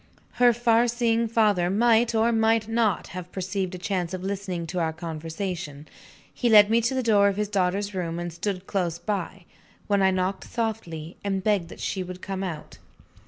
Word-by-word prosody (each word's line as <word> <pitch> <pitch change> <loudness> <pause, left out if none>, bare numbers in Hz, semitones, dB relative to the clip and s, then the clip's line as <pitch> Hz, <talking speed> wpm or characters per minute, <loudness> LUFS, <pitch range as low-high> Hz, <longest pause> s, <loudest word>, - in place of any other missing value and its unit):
Her 245 -1 +7
far 235 0 +3
seeing 230 -1 +1
father 210 -6 +2
might 230 +3 +3
or 225 +1 +3
might 225 -1 +2
not 225 -4 0
have 180 0 -8
perceived 190 0 -3
a - - -5
chance 180 -1 -2
of 185 - -7
listening 190 -3 -3
to 180 +2 -3
our 165 -1 0
conversation. 160 -1 -5 0.5
He 240 - 0
led 210 -1 +7
me 230 +1 +4
to 235 +4 0
the 260 - 0
door 205 -3 +4
of 200 -1 0
his 210 0 0
daughter's 200 +1 0
room; 170 -3 -3
and 175 -1 -4
stood 185 +1 -3
close 175 -5 -1
by, 190 0 -4 0.4
when 200 -1 +2
I 190 - +5
knocked 185 +1 -1
softly, 180 -9 -4
and 195 -2 -1
begged 200 -5 +1
that - - -11
she 190 - -2
would 180 0 -7
come 195 0 -4
out. 165 -5 -6
195 Hz, 190 wpm, -25 LUFS, 180-220 Hz, 0.5 s, Her